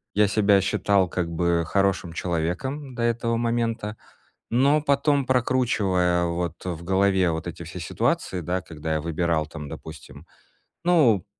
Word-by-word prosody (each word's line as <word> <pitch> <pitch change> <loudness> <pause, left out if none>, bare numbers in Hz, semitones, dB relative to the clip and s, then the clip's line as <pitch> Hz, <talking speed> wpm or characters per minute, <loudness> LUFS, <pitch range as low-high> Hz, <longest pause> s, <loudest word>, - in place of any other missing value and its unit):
я 105 0 +4
себя 100 -1 +4
считал 95 0 +2
как 85 -2 -2
бы 85 0 +1
хорошим 95 -3 +1
человеком 95 - -3
до 120 - -2
этого 115 0 0
момента. 115 -2 -1 0.6
Но 140 +5 +3
потом, 140 -1 +2
прокручивая 105 -9 +1
вот 85 0 -3
в 85 -3 -4
голове 95 -1 +2
вот 80 +1 -4
эти 85 0 -6
все 90 +3 -8
ситуации, 90 +2 -1
да, 90 +2 -2
когда 80 -1 -4
я 80 - 0
выбирал 85 -1 0
там, 80 -2 -8
допустим, 75 +1 -10 0.6
ну, 145 - +4
95 Hz, 140 wpm, -24 LUFS, 85-115 Hz, 0.6 s, я